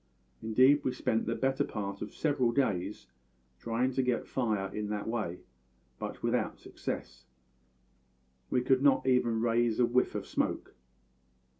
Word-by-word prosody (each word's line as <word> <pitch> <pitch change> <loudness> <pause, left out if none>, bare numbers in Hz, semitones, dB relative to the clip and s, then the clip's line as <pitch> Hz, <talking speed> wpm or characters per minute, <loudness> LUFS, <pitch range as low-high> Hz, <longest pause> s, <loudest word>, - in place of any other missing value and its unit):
Indeed 130 +6 +4
we 130 - 0
spent 110 - -1
the - - 0
better 135 +1 +1
part 100 -5 -5
of - - -5
several 140 -6 +1
days 105 -7 -1 0.5
trying 120 - 0
to 130 - +1
get 125 -2 0
fire 105 -6 -1
in 105 -1 -3
that 105 0 -3
way, 105 -7 -3 0.6
but - - -6
without - - 0
success; - - -6 1.2
we 125 - +2
could 130 +1 +3
not 140 -2 +4
even 120 -3 +2
raise 115 -1 +2
a 125 - +6
whiff 125 +2 +1
of - - -3
smoke. - - -2
120 Hz, 145 wpm, -31 LUFS, 105-130 Hz, 1.2 s, a